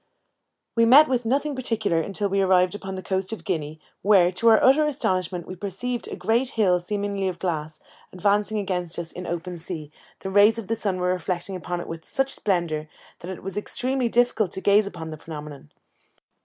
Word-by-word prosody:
We 230 - +4
met 280 +6 +8
with 245 -3 -1
nothing 285 +4 0
particular 225 -9 0
until 200 +3 -2
we 195 0 +1
arrived 185 -1 +3
upon 195 -2 -6
the 185 - -6
coast 190 +2 -2
of 225 - -6
Guinea, 155 -5 -3 0.2
where, 190 -3 +5
to 190 +6 0
our 220 - +7
utter 295 +4 +5
astonishment, 185 - -1
we 185 - -7
perceived 205 +6 -4
a - - -5
great 235 +3 +1
hill, 185 -5 +4
seemingly 200 +1 -2
of 180 -2 -3
glass, 155 -4 -3 0.3
advancing 205 +3 +1
against 180 -4 -2
us 170 -1 -5
in 180 - -7
the - - -5
open 175 +1 -4
sea; 160 -3 -7 0.3
the 190 - -4
rays 205 +3 +5
of 225 -3 -6
the 225 - +1
sun 200 -4 -1
were 180 0 0
reflected 185 +1 -3
upon 175 -1 -4
it - - -8
with 165 -1 -7
such 270 0 0
splendour, 170 -6 -1 0.3
that 175 - -8
it 190 - -7
was 195 +2 -5
extremely 250 +4 -1
difficult 235 -5 +2
to - - -2
gaze 200 +1 +4
at - - -7
the 160 -2 -7
phenomenon. 150 - -9
190 Hz, 200 wpm, -24 LUFS, 175-220 Hz, 0.3 s, met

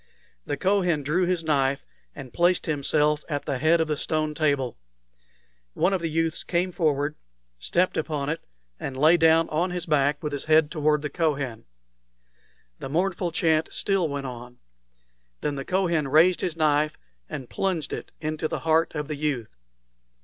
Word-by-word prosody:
The 145 - -2
Kohen 180 -6 +1
drew 175 +6 +1
his 180 -2 0
knife, 140 -3 +1 0.3
and 130 - -9
placed 175 +1 +2
himself 150 0 +1
at 145 -2 -3
the 135 -3 -2
head 160 +3 +4
of 160 - +1
the 155 - 0
stone 155 +1 -1
table. 140 -6 0 1.0
One 195 - +2
of 190 - 0
the 165 - -1
youths 165 +1 0
came 180 +1 0
forward, 150 -4 0 0.5
stepped 180 - +1
upon 150 -3 -2
it, 160 +3 -2 0.4
and 130 - -5
lay 155 +5 +6
down 165 -1 +4
on 170 +4 0
his 180 -1 -3
back 145 -2 +1
with 150 -1 -3
his 145 - -4
head 155 -1 +4
toward 150 -2 +1
the 150 - -3
Kohen. 140 - -1 1.1
The - - -6
mournful 180 +3 0
chant 160 -1 +1
still 195 -5 0
went 140 -1 -4
on. 125 -1 -8 0.8
Then 150 - -1
the 140 -1 -4
Kohen 170 -6 +1
raised 165 +6 +4
his 170 -3 -2
knife 150 -1 +2 0.3
and 130 -3 -6
plunged 170 -4 -2
it - - -6
into 155 0 -2
the - - -4
heart 160 0 +2
of 150 -1 -3
the 150 - -3
youth. 140 - -3
155 Hz, 170 wpm, -25 LUFS, 145-170 Hz, 1.1 s, lay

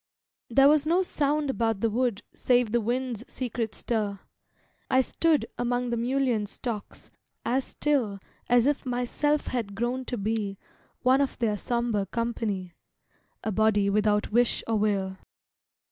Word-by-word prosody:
There 270 +4 +6
was 300 0 +4
no 350 +4 +3
sound 295 -3 0
about 225 -5 0
the 230 - +2
wood 235 -2 0
Save 245 -3 +2
the 235 0 +2
wind's 240 0 -2
secret 235 -3 -3
stir. 210 -4 -2 0.7
I 260 - +5
stood 315 +3 +1
Among 245 0 0
the - - +1
mullein 240 -2 0
stalks 220 0 -6 0.3
as 255 +3 +1
still 260 -9 0 0.3
As 245 0 +5
if 290 0 +1
myself 255 +4 0
had 225 -6 -3
grown 245 +4 -1
to 245 - -3
be 205 -1 -2 0.5
One 260 +2 +5
of 280 - -1
their 220 -3 +1
sombre 230 -2 -1
company, 210 -5 -2 0.7
A 220 - -1
body 205 -1 +3
without 210 0 +2
wish 240 +2 +2
or 225 -1 +1
will. 195 -2 0
235 Hz, 145 wpm, -27 LUFS, 210-255 Hz, 0.7 s, There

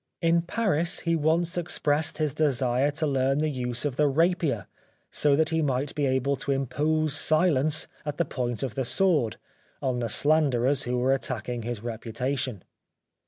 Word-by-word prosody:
In 170 0 +3
Paris 175 -2 0
he 170 -1 +1
once 165 +3 +1
expressed 155 -3 0
his 155 -3 -1
desire 135 -2 +1
to 155 +2 -1
learn 135 -1 +1
the 155 +1 +1
use 125 -1 -3
of 140 -4 -2
the 150 - +3
rapier 155 - +1 0.5
so 145 -2 +2
that 160 +2 +2
he 160 -1 0
might 135 -1 -1
be 145 -2 0
able 130 +1 +1
to 140 - -2
impose 150 +3 0
silence 155 -1 +2 0.2
at 150 -1 -4
the 170 - +1
point 120 -5 -3
of 130 -5 -3
the 135 - -2
sword 150 - +1 0.4
on 130 -2 -1
the 115 -1 -2
slanderers 140 -1 +2
who 125 0 -1
were 130 +2 +2
attacking 125 -3 -3
his 115 -1 -5
re 115 -2 -4
putation. 125 -1 -3
140 Hz, 170 wpm, -26 LUFS, 125-155 Hz, 0.5 s, In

